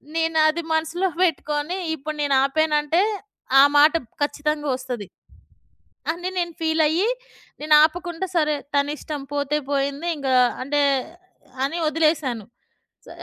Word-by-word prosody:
నేనది 325 0 +2
మనసులో 325 +4 0 0.2
పెట్టుకొని 305 0 -1 0.2
ఇప్పుడు 305 +1 -6
నేను 280 -1 +1
ఆపానంటే 305 +3 +1 0.6
ఆ - - +9
మాట 300 +2 +6 0.3
ఖచ్చితంగా 295 0 -1
ఒస్తది. 245 -6 -6 1.0
అని 350 +2 -4
నేను 345 -1 -1
ఫీలయ్యి 320 +4 +2 0.5
నేను 305 0 +2
ఆపకుండా 345 +3 -1
సరే. 305 -2 +2 0.2
తనిష్టం 290 +1 -2
పోతే 285 +1 0
పోయింది. 280 +4 -1
ఇంకా 265 -2 -1 0.3
అంటే 290 +3 -1 0.9
అని 325 +5 -3
ఒదిలేశాను. 305 -9 0 0.6
స - - -20
305 Hz, 110 wpm, -22 LUFS, 285-325 Hz, 1.0 s, ఆ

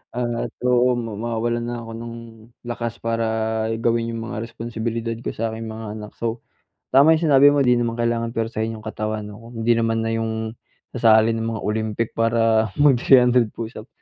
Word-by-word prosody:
at 120 -1 -2
oo, 125 0 +3
mawawalan 115 +1 -2
na 120 - -3
ako 115 - -9
ng 115 0 -7 0.5
lakas 120 -1 -4
para 115 0 0 0.5
gawin 115 0 0
yung 115 - -4
mga 120 - -4
responsibilidad 115 0 -4
ko - - -5
sa 115 0 -2
aking 110 0 -6
mga 110 0 -7
anak. 105 0 -9
So, 115 0 -3 0.5
tama 145 +5 +7
yung 165 - -2
sinabi 140 +1 +8
mo, 145 -1 +3
di 125 -1 +4
naman 115 -1 -1
kailangan 115 0 -1
puwersahin 115 0 -2
yung 110 - -12
katawan 110 -1 -3
'no, 105 +1 -10
kung 120 - -13
hindi 120 - +4
naman 115 0 0
na 115 - -1
yung 110 0 -2 0.4
sasali 110 0 +5
ng 115 0 -2
mga - - -5
Olympic 110 +1 -1
para 115 -1 +2
mag-three 135 -2 +5
hundred 125 -2 +4
push 115 0 -6
up. 110 - -15
115 Hz, 185 wpm, -22 LUFS, 110-120 Hz, 0.5 s, sinabi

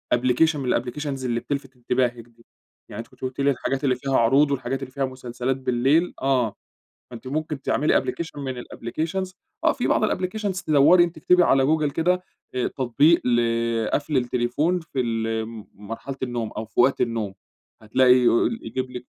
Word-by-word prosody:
application 130 +6 +2
من 130 -3 0
الApplications 135 +2 -4
اللي 120 -1 0
بتلفت 135 +1 -5
انتباهِك 120 -1 -1
دي. 115 0 -24 0.4
يعني 105 - -8
أنتِ 115 - -6
كنتِ - - -24
قُلتِ 130 +1 -5
لي 140 - +4
الحاجات 135 +1 -2
اللي 130 -3 +2
فيها 135 +1 0
عروض 135 +5 +4
والحاجات 135 0 -2
اللي 130 - -8
فيها 135 0 -1
مسلسلات 130 0 -3
بالليل 135 +6 +1
آه، 125 -6 +1 0.6
فأنتِ 120 +1 -9
ممكن 150 0 -3
تعملي 150 +2 +2
application 160 -3 -5
من 130 -3 -4
الapplications 165 +10 -4 0.3
آه، 325 - +5
في 245 - -2
بعض 215 - +3
الapplications 185 0 -2
دّوري 155 +4 +6
أنتِ، 170 -2 -3
اكتبي 180 +3 +4
على 135 -5 +4
جوجل 150 0 +1
كده، 180 +4 +1 0.3
آآ، 125 - +1
تطبيق 140 +6 +3
ل 120 -1 +3 0.5
قَفل 145 0 0
التليفون 125 +8 0
في 160 -5 -6
ال 115 -2 -1 0.3
مرحلة 115 +6 -7
النوم 120 -3 -3
أو 110 - -3
في 110 - -6
وقت 130 +3 +4
النوم، 115 -4 -1 0.5
هتلاقي 125 +4 +4
يقول 125 - +3
يجيب 130 -1 -4
لِك 125 0 -7
130 Hz, 170 wpm, -24 LUFS, 120-150 Hz, 0.6 s, دّوري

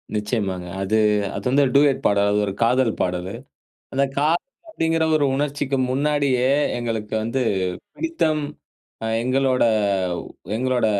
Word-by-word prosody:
நிச்சயமாங்க. 105 -4 -2
அது, 100 +3 +1 0.4
அது 100 - -6
வந்து 140 +3 +4
டூயட் 140 -1 +4
பாடல். 100 0 +2
அது 105 - +2
ஒரு 100 - -3
காதல் 120 0 +2
பாடலு. 90 +1 -2 0.6
அந்த 135 +1 +2
காதல் 155 +4 +2 0.3
அப்டிங்குற 165 - 0
ஒரு 150 -2 +3
உணர்ச்சிக்கு 140 -1 -1
முன்னாடியே 140 -2 +1 0.3
எங்களுக்கு 115 -3 -3
வந்து 115 +4 -1 0.5
பிடித்தம், 165 - 0 0.6
அ - - -1 0.2
எங்களோட 130 +1 +2 0.9
எங்களோட 125 -1 +1
130 Hz, 120 wpm, -22 LUFS, 105-145 Hz, 0.9 s, வந்து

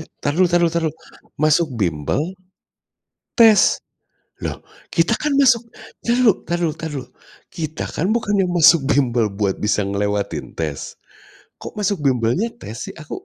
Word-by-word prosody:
Eh, 160 - -9
entar 145 - -2
dulu 185 +2 +4
entar 175 0 +2
dulu 170 - +3
entar 170 -1 0
dulu, 160 - -1 0.5
masuk 155 +2 +3
bimbel 80 - 0 1.2
tes? 220 -4 +6 0.6
Loh - - -5 0.2
kita 170 +6 +1
kan 300 -2 0
masuk 245 -4 +4 0.3
entar 235 - 0
dulu 245 -3 +5
entar 175 - -2
dulu 160 - +1
entar 160 +1 -6
dulu, 130 -3 -5 0.4
kita 155 -1 -4
kan 170 - -1
bukannya 205 -5 +1
masuk 170 -3 +5
bimbel 120 -6 +2
buat 100 -1 -2
bisa 105 0 +1
ngelewatin 100 +1 -2
tes? 75 -4 -4 0.6
Kok - - -9
masuk 200 0 +1
bimbelnya 130 - +1
tes 115 - -8
sih? - - -10
Aku 155 -2 -8
160 Hz, 160 wpm, -20 LUFS, -, 1.2 s, tes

